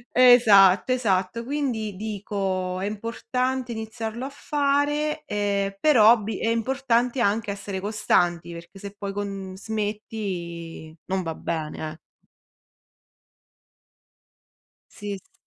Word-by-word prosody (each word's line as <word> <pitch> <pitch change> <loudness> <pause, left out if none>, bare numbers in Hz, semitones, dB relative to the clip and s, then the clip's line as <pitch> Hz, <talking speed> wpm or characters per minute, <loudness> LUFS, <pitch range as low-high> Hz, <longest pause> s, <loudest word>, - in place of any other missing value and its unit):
Esatto, 225 -5 +7
esatto. 205 -3 0
Quindi 240 -7 -2
dico: 195 -3 -3
"È 195 - -2
importante 250 +4 -2
iniziarlo 225 +2 -5
a - - -4
fare, 290 +2 0
ehm, 200 -1 -1
per 300 +1 +4
hobby, 220 0 +5
è 225 - -1
importante 245 +1 +1
anche 220 -1 +1
essere 200 -1 -4
costanti, 175 -4 0
perché 170 +3 -11
se 200 0 -8
poi 200 -1 -5
con 195 -2 -5
smetti 190 -7 -5
non 190 0 -1
va 165 -1 -3
bene, 155 -1 -4
eh". 155 - -15 2.9
Sì, 205 -2 -6
s - - -23
210 Hz, 110 wpm, -25 LUFS, 190-235 Hz, 2.9 s, Esatto